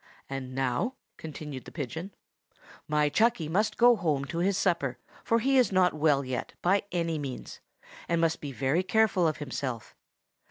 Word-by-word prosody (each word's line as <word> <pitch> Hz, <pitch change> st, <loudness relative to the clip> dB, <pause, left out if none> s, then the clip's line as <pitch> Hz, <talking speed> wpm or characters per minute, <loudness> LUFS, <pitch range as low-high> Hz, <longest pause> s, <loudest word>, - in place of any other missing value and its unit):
"And 130 Hz, -1 st, -6 dB
now," 135 Hz, -, 0 dB, 0.2 s
continued 150 Hz, -4 st, -7 dB
the -, -, -10 dB
pigeon, 160 Hz, +6 st, -5 dB, 0.7 s
"my 150 Hz, -1 st, +2 dB
Chucky 220 Hz, 0 st, +2 dB
must 210 Hz, +7 st, 0 dB
go 240 Hz, 0 st, +7 dB
home 155 Hz, -9 st, 0 dB
to 165 Hz, -, -1 dB
his 190 Hz, +2 st, +2 dB
supper, 165 Hz, -10 st, 0 dB, 0.3 s
for 230 Hz, -, +2 dB
he 265 Hz, +3 st, +3 dB
is 250 Hz, -, +3 dB
not 185 Hz, -3 st, +4 dB
well 145 Hz, -3 st, +2 dB
yet, 130 Hz, -2 st, -4 dB
by 190 Hz, +3 st, +3 dB
any 165 Hz, -3 st, -1 dB
means, 135 Hz, -3 st, -6 dB, 0.5 s
and 170 Hz, 0 st, +2 dB
must 165 Hz, 0 st, +1 dB
be 145 Hz, -, -5 dB
very 135 Hz, +6 st, +1 dB
careful 190 Hz, -2 st, +3 dB
of 155 Hz, -, -1 dB
himself. 130 Hz, -5 st, -5 dB
160 Hz, 165 wpm, -28 LUFS, 140-190 Hz, 0.7 s, go